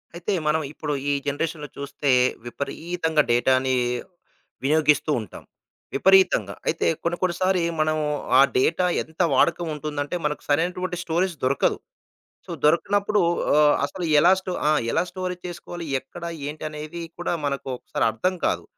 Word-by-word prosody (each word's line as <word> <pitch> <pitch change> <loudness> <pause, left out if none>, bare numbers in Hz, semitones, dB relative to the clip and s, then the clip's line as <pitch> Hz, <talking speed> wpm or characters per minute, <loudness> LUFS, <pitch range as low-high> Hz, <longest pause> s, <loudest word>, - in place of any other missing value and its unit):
అయితే 175 +4 -2
మనం 160 +1 +2
ఇప్పుడు 150 -2 -3 0.2
ఈ - - +3 0.2
జనరేషన్‌లో 150 +1 -2
చూస్తే, 140 0 -1 0.3
విపరీతంగా 160 +5 -1
డేటాని 130 +2 +3 0.9
వినియోగిస్తూ 150 +1 +3
ఉంటాం. 105 - -11 0.5
విపరీతంగా. 185 - +4
అయితే 165 - 0 0.2
కొన్ని 170 +1 -1
కొన్నిసారి 185 0 +1 0.2
మనం 155 0 +2 0.4
ఆ - - +9 0.2
డేటా 165 +7 +2 0.2
ఎంత 160 +2 -6
వాడకం 170 0 +2
ఉంటుందంటే, 150 +1 -4
మనకు 150 0 -2
సరైనటువంటి 180 +4 0
స్టోరేజ్ 175 +1 0
దొరకదు. 135 +1 +2 0.7
సో - - -8
దొరికనప్పుడు 200 +6 +2 0.3
ఆహ్, 150 -1 +5
అసలు 180 +5 -7 0.2
ఎలా 175 +4 +6
స్టో 190 -1 -6 0.2
ఆ! - - +4 0.2
ఎలా - - +2
స్టోరేజ్ 180 -1 -4
చేసుకోవాలి? 175 -1 -7
ఎక్కడ 175 +5 -12 0.3
ఏంటనేది 155 +2 -6 0.2
కూడా 175 - -2
మనకు 140 -1 -3
ఒకసారి - - -2
అర్థం 180 +12 -1
కాదు. - - 0
160 Hz, 130 wpm, -24 LUFS, 145-180 Hz, 0.9 s, ఆ